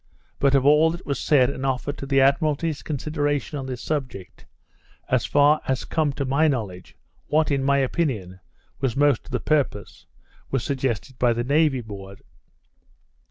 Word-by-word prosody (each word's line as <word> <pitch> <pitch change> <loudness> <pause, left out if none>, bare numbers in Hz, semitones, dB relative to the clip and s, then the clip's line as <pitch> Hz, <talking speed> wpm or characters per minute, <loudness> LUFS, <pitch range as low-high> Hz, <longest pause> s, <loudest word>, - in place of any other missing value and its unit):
But 140 0 +3
of 135 -1 +3
all 150 +3 +5
that 170 +2 -6
was 140 -2 -2
said 135 -3 +3
and 130 - -6
offered 135 +2 -2
to 140 - -6
the 135 0 +3
Admiralty's 150 +3 +1
consideration 145 0 -2
on 130 - -6
this 125 -2 -6
subject, 130 - -5 0.6
as 125 -2 +1
far 145 +1 +4
as 130 -1 -1
has - - -9
come 155 -3 0
to 140 0 -3
my 140 +4 +2
knowledge, 105 -10 -4 0.3
what, 155 0 +1
in 135 -1 +1
my 140 +1 +3
opinion, 125 - -1 0.4
was 130 -4 -1
most 145 -3 +2
to - - -14
the 125 - -1
purpose, 140 -9 -2 0.4
was 135 -3 -1
suggested 130 -2 -3
by 120 -1 +3
the 120 +1 -2
Navy 145 0 +2
board. 100 -3 -10
135 Hz, 170 wpm, -23 LUFS, 125-145 Hz, 0.6 s, all